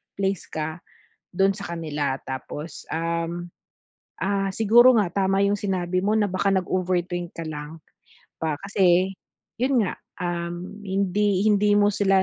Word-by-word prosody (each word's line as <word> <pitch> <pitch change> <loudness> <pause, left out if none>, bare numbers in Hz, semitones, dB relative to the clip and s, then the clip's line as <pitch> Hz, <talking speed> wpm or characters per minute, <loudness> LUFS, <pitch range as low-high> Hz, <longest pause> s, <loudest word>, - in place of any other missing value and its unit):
place 195 -2 -1
ka, 160 +2 -4 0.5
dun 195 +2 +3
sa 195 -4 -5
kanila. 150 -5 -2
Tapos, 145 +4 -7
um, 170 +1 -2 0.7
ah, 195 0 +1
siguro 240 +4 +6
nga 205 -6 +2 0.2
tama 195 +1 +2
'yung 200 +1 +1
sinabi 185 -2 -1
mo 205 +3 +1
na 215 -1 +3
baka 190 +2 +1
nag-overthink 180 -1 -1
ka 165 - -5
lang 150 +1 -7 0.6
ba, 155 -2 -1
kasi, 185 -1 +3 0.5
'yun 260 -1 +3
nga, - - -3 0.3
um, 175 +2 -4
hindi 195 0 +1
hindi 205 0 +4
mo 205 0 +5
sila 195 -1 +3
185 Hz, 135 wpm, -24 LUFS, 170-200 Hz, 0.7 s, siguro